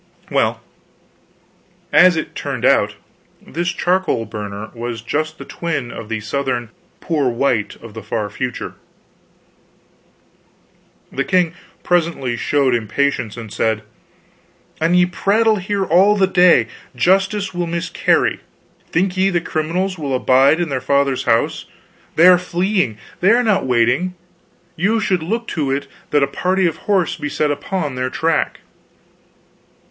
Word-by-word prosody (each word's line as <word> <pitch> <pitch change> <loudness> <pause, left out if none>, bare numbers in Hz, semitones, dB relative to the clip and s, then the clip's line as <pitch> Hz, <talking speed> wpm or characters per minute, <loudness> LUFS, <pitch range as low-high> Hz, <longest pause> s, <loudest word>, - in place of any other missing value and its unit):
Well, - - +1 1.3
as 175 +4 +7
it 160 - -4
turned - - -3
out, - - +3 0.4
this 175 +3 -3
charcoal 175 -8 0
burner 105 0 -7
was 115 -1 -5
just 155 +5 -2
the - - -9
twin 155 -8 -3
of 105 - -8
the 110 -1 -3
Southern 125 0 -2 0.3
"poor 150 -6 0
white" 120 -3 0
of 115 -2 -10
the 110 - -7
far 110 0 -3
future. 125 +3 -4 2.4
The 135 - -1
king 180 -2 +1 0.3
presently 165 -8 0
showed 135 +1 +1
impatience, 115 0 -1
and 115 -3 -8
said: 110 -1 0 1.0
"An 165 +3 +2
ye 180 0 +5
prattle 215 +5 +2
here 195 +1 -1
all 190 +5 +4
the 195 - +4
day, 180 -10 +5 0.3
justice 190 - +1
will 175 -1 -2
miscarry. 170 0 +1 0.5
Think 180 +2 0
ye 190 +1 +2
the 175 -2 +1
criminals 170 +4 -2
will 140 -3 -2
abide 135 +5 +4
in 175 -2 -1
their 130 -2 -2
father's 140 0 +1
house? 115 -1 +1 0.5
They 165 - +5
are 180 -1 +7
fleeing, 180 - 0 0.2
they 185 - +3
are 240 +3 +4
not 205 - +1
waiting. 125 +9 +1 0.6
You 200 +7 +1
should 185 -5 0
look 225 +8 -3
to 150 -5 -2
it 140 +1 -1 0.2
that 145 -1 +3
a - - +2
party 185 +6 0
of 165 - 0
horse 190 -5 +2
be 150 - -4
set 150 0 0
upon 145 +1 -3
their 130 0 -2
track." 160 +3 -1
155 Hz, 140 wpm, -19 LUFS, 125-185 Hz, 2.4 s, as